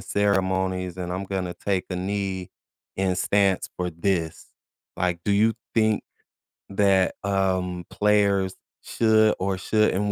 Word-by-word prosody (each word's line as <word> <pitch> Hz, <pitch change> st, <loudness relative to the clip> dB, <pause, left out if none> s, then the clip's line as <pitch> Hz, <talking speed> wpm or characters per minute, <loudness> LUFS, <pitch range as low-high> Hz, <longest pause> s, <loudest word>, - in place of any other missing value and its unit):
ceremonies, 95 Hz, -2 st, 0 dB
and 90 Hz, -1 st, -4 dB
I'm 95 Hz, +2 st, -3 dB
gonna 95 Hz, -2 st, -3 dB
take 95 Hz, -2 st, -1 dB
a 90 Hz, -, -2 dB
knee 95 Hz, -1 st, -3 dB, 0.5 s
and 95 Hz, -1 st, 0 dB
stance 100 Hz, -2 st, +2 dB
for 90 Hz, -1 st, -2 dB
this." 85 Hz, -1 st, -2 dB, 0.5 s
like, 90 Hz, -2 st, -1 dB
do 105 Hz, -, 0 dB
you 110 Hz, +3 st, +3 dB, 0.2 s
think 110 Hz, -1 st, +3 dB, 0.7 s
that, 95 Hz, -1 st, +2 dB
um, 95 Hz, -3 st, 0 dB
players 100 Hz, -2 st, +2 dB, 0.3 s
should 110 Hz, -1 st, +3 dB
or 95 Hz, 0 st, -1 dB
shouldn't, 105 Hz, 0 st, +1 dB
95 Hz, 125 wpm, -24 LUFS, 90-100 Hz, 0.7 s, you